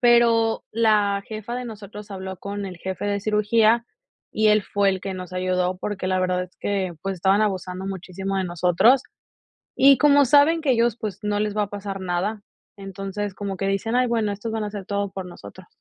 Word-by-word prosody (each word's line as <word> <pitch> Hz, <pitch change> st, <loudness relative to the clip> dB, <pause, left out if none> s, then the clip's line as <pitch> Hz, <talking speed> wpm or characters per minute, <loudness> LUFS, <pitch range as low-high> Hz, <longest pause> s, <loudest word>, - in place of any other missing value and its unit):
Pero 235 Hz, -2 st, +4 dB
la 210 Hz, -3 st, +2 dB
jefa 220 Hz, +2 st, -6 dB
de 250 Hz, 0 st, -4 dB
nosotros 210 Hz, -2 st, -9 dB
habló 190 Hz, -1 st, -6 dB
con 200 Hz, +1 st, -5 dB
el 185 Hz, -2 st, -8 dB
jefe 190 Hz, +3 st, -5 dB
de 200 Hz, 0 st, -1 dB
cirugía 215 Hz, +2 st, +3 dB, 0.5 s
y 215 Hz, 0 st, +3 dB
él 210 Hz, -1 st, +4 dB
fue 200 Hz, 0 st, +1 dB
el 190 Hz, -1 st, 0 dB
que 195 Hz, 0 st, -4 dB
nos 185 Hz, -1 st, -8 dB
ayudó, 185 Hz, 0 st, 0 dB
porque 200 Hz, -1 st, -4 dB
la 185 Hz, 0 st, +1 dB
verdad 180 Hz, 0 st, 0 dB
es 180 Hz, -, -19 dB
que, 195 Hz, -3 st, -1 dB
pues, 195 Hz, 0 st, -2 dB
estaban 190 Hz, +3 st, +2 dB
abusando 190 Hz, -2 st, -2 dB
muchísimo 195 Hz, +1 st, -4 dB
de 190 Hz, -, 0 dB
nosotros. 180 Hz, +9 st, +3 dB, 0.7 s
Y 275 Hz, -1 st, +7 dB
como 285 Hz, -1 st, +6 dB
saben 295 Hz, +5 st, +4 dB
que 285 Hz, -, +1 dB
ellos, 235 Hz, -2 st, +2 dB
pues, 205 Hz, -3 st, -5 dB
no 210 Hz, 0 st, 0 dB
les 210 Hz, 0 st, -1 dB
va 210 Hz, -, +2 dB
a 200 Hz, -, -11 dB
pasar 200 Hz, -1 st, -5 dB
nada. 185 Hz, +4 st, -2 dB, 0.4 s
Entonces, 195 Hz, 0 st, -5 dB
como 200 Hz, -1 st, -4 dB
que 195 Hz, -, -2 dB
dicen: 195 Hz, +4 st, -1 dB
"Ay, 250 Hz, 0 st, +3 dB
bueno, 225 Hz, -3 st, 0 dB
estos 210 Hz, +3 st, -5 dB
van 220 Hz, -1 st, -2 dB
hacer 205 Hz, -2 st, -6 dB
todo 200 Hz, -1 st, -2 dB
por 190 Hz, -2 st, -6 dB
nosotros". 100 Hz, -, -12 dB
200 Hz, 200 wpm, -23 LUFS, 190-220 Hz, 0.7 s, Y